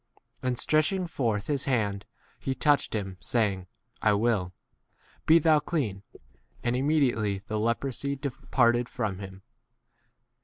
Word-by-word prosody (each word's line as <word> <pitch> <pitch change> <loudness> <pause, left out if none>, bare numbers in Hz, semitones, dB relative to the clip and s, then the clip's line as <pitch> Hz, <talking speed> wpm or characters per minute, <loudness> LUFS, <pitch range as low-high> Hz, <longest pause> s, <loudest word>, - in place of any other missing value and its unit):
And 125 -1 -1
stretching 180 - +1
forth 115 -11 -1
his 140 -2 -1
hand 105 -7 0 0.3
he 135 - -2
touched 145 -5 +2
him, 95 -3 -3
saying, 100 -6 0 0.3
I 105 - +4
will; 100 -4 +1 0.8
be 160 - +8
thou 155 -1 +4
clean: 140 - -2 0.6
and 120 0 +1
imme 145 +5 +2
diately 100 -3 -2
the 110 0 -2
leprosy 130 +5 -1
departed 125 -3 +1
from 110 -7 -2
14 100 0 -6
him. 95 - -17
120 Hz, 130 wpm, -28 LUFS, 105-140 Hz, 0.8 s, be